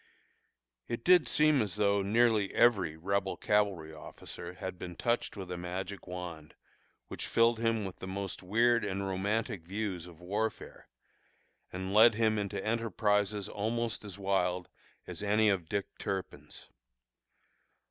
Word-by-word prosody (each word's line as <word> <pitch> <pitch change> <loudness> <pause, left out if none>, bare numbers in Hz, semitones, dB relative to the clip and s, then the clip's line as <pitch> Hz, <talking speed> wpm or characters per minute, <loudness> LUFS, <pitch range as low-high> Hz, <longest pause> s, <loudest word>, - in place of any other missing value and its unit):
It 115 0 -4
did 180 -3 +6
seem 150 -2 +4
as 100 -4 -2
though 100 -1 +2
nearly 110 0 +3
every 95 -10 +3
Rebel 95 +3 -1
cavalry 100 -7 +1
officer 85 +3 -9
had 90 0 -6
been 90 -1 -6
touched 120 0 -1
with 95 -2 -6
a 90 - -3
magic 95 +3 -5
wand 90 -4 -7 0.5
which - - -5
filled 115 0 +3
him 115 -2 +1
with 95 - -7
the 95 - -7
most 95 0 -4
weird 115 +5 +3
and 100 -1 -2
romantic 100 +2 -1
views 95 -1 -4
of 85 -2 -14
warfare, 105 +5 -4 0.8
and 95 +1 -4
led 110 +2 +7
him 110 -1 +2
into 100 -1 -3
enterprises 105 -2 +1
almost 115 +2 -2
as 100 -3 -8
wild 90 -2 0 0.4
as - - -7
any 105 +1 +3
of 90 -5 0
Dick 100 -1 -1
Turpin's. 95 -3 -5
100 Hz, 140 wpm, -31 LUFS, 90-110 Hz, 0.8 s, led